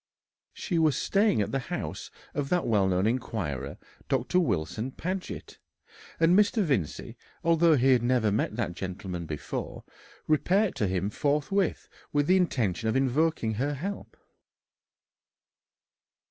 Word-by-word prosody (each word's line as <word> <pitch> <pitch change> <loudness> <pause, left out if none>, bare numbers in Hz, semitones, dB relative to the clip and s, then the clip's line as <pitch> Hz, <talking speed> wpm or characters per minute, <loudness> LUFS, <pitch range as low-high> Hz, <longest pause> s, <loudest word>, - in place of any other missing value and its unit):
She 175 -4 -1
was 155 -5 +3
staying 200 - +2
at - - -5
the 135 - 0
house - - -4 0.2
of 140 -1 -2
that 180 -1 +1
well 105 -4 +3
known 95 +1 +1
inquirer, 110 - -2 0.3
Dr. 135 +6 +1
Wilson 110 - -1
Paget, 185 +4 -5 0.6
and 165 +2 +5
Mr. 210 +2 +4
Vincey, 125 - -2 0.3
although 165 -1 +4
he 135 0 +4
had 125 -3 +4
never 120 -3 +2
met 105 +1 0
that 110 -7 -2
gentleman 90 -2 -5
before, 75 -2 -5 0.4
repaired 185 +6 +2
to 105 - +1
him 95 +2 -1
forthwith 150 - 0 0.2
with 145 -1 +2
the 185 +4 +4
intention 110 - 0
of 110 - 0
invoking 135 -2 +1
her 145 +1 0
help. 195 +9 -6
135 Hz, 130 wpm, -28 LUFS, 105-165 Hz, 0.6 s, and